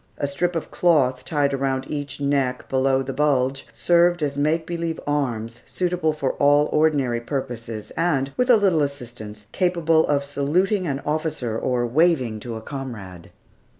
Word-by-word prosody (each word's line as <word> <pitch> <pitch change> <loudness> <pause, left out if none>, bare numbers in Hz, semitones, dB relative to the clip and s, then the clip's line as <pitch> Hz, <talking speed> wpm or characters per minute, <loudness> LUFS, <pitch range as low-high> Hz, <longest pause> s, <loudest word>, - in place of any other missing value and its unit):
A 145 - -1
strip 170 +6 -1
of 165 - -4
cloth 130 -7 +2
tied 140 0 0
around 135 -1 -1
each 145 -2 -5
neck, 140 -3 0
below 135 0 +1
the 135 0 -5
bulge, 135 -1 +1
served 175 -1 +3
as 140 -1 -1
make 155 +3 +1
believe 170 -1 -3
arms, 120 -5 -2
suitable 175 -3 -1
for 140 -3 -2
all 145 +1 +4
ordinary 140 -6 +2
purposes, 115 -5 -5
and, 140 -5 0
with 250 0 0
a 240 - +8
little 190 -7 +2
assistance, 120 -7 -5
capable 170 -3 +2
of 140 -1 +1
saluting 175 +8 0
an 140 -1 -3
officer 150 -7 -2
or 120 +1 0
waving 130 -4 +2
to 115 +1 -6
a 110 - -6
comrade. 110 - -8
140 Hz, 155 wpm, -23 LUFS, 125-160 Hz, -, a